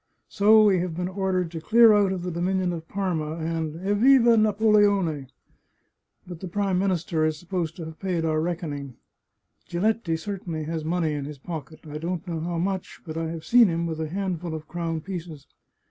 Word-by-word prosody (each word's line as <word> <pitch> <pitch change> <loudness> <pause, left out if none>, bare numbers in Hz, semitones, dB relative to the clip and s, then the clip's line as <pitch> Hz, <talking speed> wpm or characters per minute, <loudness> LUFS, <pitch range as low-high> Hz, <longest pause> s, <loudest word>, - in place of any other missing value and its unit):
So 215 +1 +5
we 195 -3 +4
have 175 -2 -3
been 180 +1 -2
ordered 185 -2 -1
to 165 -2 -6
clear 225 +4 +6
out 205 -2 +3
of 185 -2 -3
the 180 - -3
dominion 180 +1 0
of 165 -1 -7
Parma, 165 -6 -2
and, 160 -1 -3
Evriva 235 +5 +5
Napoleone! 205 -8 +3 1.0
But 175 -2 -9
the 185 - -6
Prime 195 0 0
Minister 175 -4 0
is 155 -1 +1
supposed 175 -1 -3
to 165 - -7
have 160 0 -10
paid 180 -4 -1
our 155 -1 +1
reckoning. 155 -6 -4 0.7
Giletti 180 -2 0
certainly 170 -3 -5
has 160 0 -3
money 165 -1 0
in 145 -2 -3
his 150 0 -7
pocket. 155 +1 -8
I 150 0 -6
don't 175 +2 -4
know 165 -2 -3
how 170 +1 -3
much, 190 +2 -3
but 160 -2 -6
I 165 0 -2
have 165 -1 -6
seen 240 -2 +6
him 170 -1 -1
with 160 -1 -3
a 155 - -3
handful 180 -3 -3
of 155 -1 -8
crown 165 -2 -3
pieces. 165 -5 -7
175 Hz, 190 wpm, -25 LUFS, 160-195 Hz, 1.0 s, clear